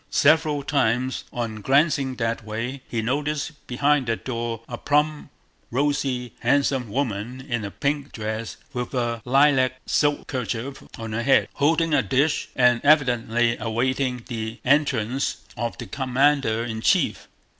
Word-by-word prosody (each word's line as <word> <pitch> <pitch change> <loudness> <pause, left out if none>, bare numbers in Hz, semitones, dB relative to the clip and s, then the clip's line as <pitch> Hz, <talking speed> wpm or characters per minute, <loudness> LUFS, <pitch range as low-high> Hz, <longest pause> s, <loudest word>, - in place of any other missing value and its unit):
Several 150 -1 +3
times 130 -2 0
on 115 -3 -4
glancing 135 +1 +2
that 115 -2 -2
way 115 +5 -4
he 115 -2 -2
noticed 150 +5 -1 0.2
behind 140 +1 +2
that 115 -1 -2
door 115 -2 -3
a 120 - -5
plump, 150 +3 0 0.4
rosy, 135 -2 -1
handsome 135 -4 +1
woman 120 0 -2
in 120 -5 -3
a 100 - -3
pink 140 - -2
dress 110 0 -4 0.2
with 125 +1 -4
a 120 -2 -1
lilac 135 -1 +4
silk 145 -1 +1
kerchief 125 +1 -4 0.2
on 115 -1 -6
her 115 - -1
head, 135 +3 +3
holding 160 +2 +2
a 145 - +5
dish 140 +4 +1
and 125 -2 +4
evidently 120 -5 +3
awaiting 125 +2 -1
the 110 -2 -4
entrance 135 -2 +1
of 115 +1 -3
the - - -6
commander 130 -3 +1
in 110 -1 -4
chief. - - +1
130 Hz, 140 wpm, -24 LUFS, 115-140 Hz, 0.4 s, a